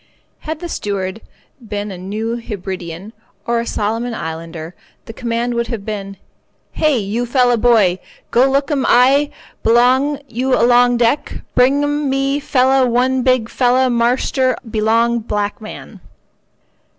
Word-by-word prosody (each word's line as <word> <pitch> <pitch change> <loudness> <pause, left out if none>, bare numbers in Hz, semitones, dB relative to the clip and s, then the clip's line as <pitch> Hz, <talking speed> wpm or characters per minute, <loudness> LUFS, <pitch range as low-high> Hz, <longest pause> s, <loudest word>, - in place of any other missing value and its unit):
Had 315 0 -6
the 350 - -4
steward 200 - -4 0.4
been 205 -2 -5
a 185 - -7
New 215 +5 -3
Hebridean 190 -3 -7 0.3
or 235 0 0
a 235 - -4
Solomon 225 +3 -2
islander, 165 0 -6 0.3
the 225 - -9
command 235 +1 -2
would 235 0 -1
have 225 -5 -5
been: 195 -2 -5 0.5
"Hey, 305 -4 +1
you 225 +3 -2
fella 245 -1 +3
boy, 215 -6 +3 0.3
go 255 +3 +4
look 275 +2 0
'm 275 -3 +1
eye 270 +4 +4 0.3
belong 260 +5 +3
you 255 +2 0
along 245 +1 +4
deck, 235 +4 0
bring 270 +3 +3
'm 290 -1 -1
me 275 +1 0
fella 265 -1 +2
one 255 +2 +1
big 255 -3 +2
fella 255 +1 +2
marster 250 +2 +1
belong 230 +2 +1
black 210 +1 -3
man." 215 - -10
235 Hz, 140 wpm, -17 LUFS, 215-260 Hz, 0.5 s, go